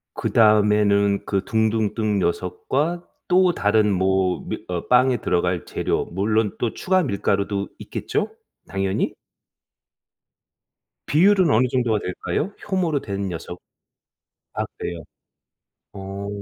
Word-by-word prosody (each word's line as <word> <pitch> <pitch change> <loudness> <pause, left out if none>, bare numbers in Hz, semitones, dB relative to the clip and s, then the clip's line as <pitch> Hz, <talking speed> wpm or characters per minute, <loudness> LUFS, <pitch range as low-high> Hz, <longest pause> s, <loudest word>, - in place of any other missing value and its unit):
그다음에는 105 -2 +3
그 100 -1 -1
둥둥 110 -1 +1
뜬 105 -3 0
녀석과 140 - -1 0.2
또 180 -1 +4
다른 105 -2 +2
뭐 95 0 +1
밀 - - -5
어 90 -2 -4
빵에 125 0 +4
들어갈 90 -3 0
재료 - - -1
물론 105 +3 0
또 120 - -1
추가 185 0 +1
밀가루도 100 -3 -1
있겠죠? - - -3 0.4
당연히? 95 0 -1 1.9
비율은 185 +2 +4
어느 125 +3 +4
정도가 120 -5 +1
될까요? 155 - -3 0.2
효모로 170 -7 0
된 100 -1 -4
녀석. 85 +1 -7 0.9
아 - - -1
그래요? 85 -2 -5 0.9
어. 100 0 -6
105 Hz, 225 characters per minute, -22 LUFS, 95-125 Hz, 1.9 s, 또